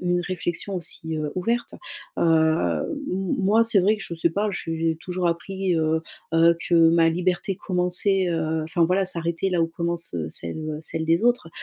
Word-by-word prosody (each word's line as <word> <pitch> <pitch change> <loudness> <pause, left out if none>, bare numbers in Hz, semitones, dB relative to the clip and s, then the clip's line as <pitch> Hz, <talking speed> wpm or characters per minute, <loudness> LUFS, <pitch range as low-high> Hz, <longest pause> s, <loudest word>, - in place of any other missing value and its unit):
une 175 0 +1
réflexion 185 +1 -3
aussi, 160 -2 -2
heu, 150 -1 -3
ouverte. 230 +6 -1 0.4
Heu, 160 - +2 0.3
m 190 0 -1
moi 210 +4 +4
c'est 225 -4 +3
vrai 210 +4 +3
que 210 - -8
je 170 - -5
sais 165 0 +1
pas, 205 +4 0
j'ai 165 -2 -2
toujours 180 0 -2
appris, 185 +2 -1
heu 160 0 +1 0.3
heu, 165 +1 +5
que 175 - +2 0.2
ma 165 -1 +4
liberté 180 +3 -1
commençait, 180 +1 0
heu, 160 -1 -1
enfin 165 +1 +1
voilà, 185 +3 +2
s'arrêtait 170 +1 -1
là 175 -2 +1
où - - +2
commence, 170 - -3
heu, 80 -2 -2
celle, 85 - -4
heu, 150 - -4
celle 160 0 -2
des 165 +7 +2
autres, 245 -9 +2
170 Hz, 185 wpm, -24 LUFS, 165-185 Hz, 0.4 s, heu